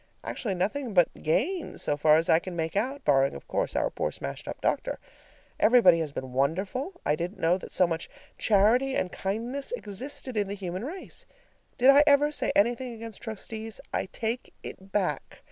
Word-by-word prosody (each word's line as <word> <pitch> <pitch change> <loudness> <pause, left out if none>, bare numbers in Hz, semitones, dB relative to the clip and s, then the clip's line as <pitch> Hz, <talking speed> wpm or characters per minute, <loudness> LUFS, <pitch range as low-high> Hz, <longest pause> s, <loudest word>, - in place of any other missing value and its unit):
Actually, 205 -7 -3
nothing 210 +5 -2
but 175 -2 +4
gain 295 - 0
so 145 - 0
far 150 +1 +5
as 165 +1 +2
I 160 - +5
can 180 0 -7
make 160 +1 -2
out, 260 +7 -1
barring, 135 -1 +3
of 70 - -10
course, - - -1
our - - +1
poor - - -2
smashed 70 0 -7
up - - -6
doctor. - - -1 0.6
Everybody 215 -8 +6
has 155 -3 -2
been 130 -2 -6
wonderful; 190 - -1
I 150 - +3
didn't 175 +6 -4
know 175 +3 +2
that - - -10
so 185 - +4
much 165 -1 -3 0.3
charity 230 +6 +3
and 180 - -1
kindness 235 - -3
existed 255 - -4
in 205 -1 +1
the 200 - -4
human 185 0 -5
race. 350 +8 -7 0.5
Did 260 +2 +7
I 285 +1 +7
ever 290 +1 +5
say - - 0
anything 240 +3 +1
against 225 -2 -8
trustees? 220 0 -6
I - - -1
take 230 +4 -3
it 190 +1 -9
back. 180 -9 -2
205 Hz, 185 wpm, -28 LUFS, 170-250 Hz, 0.6 s, Did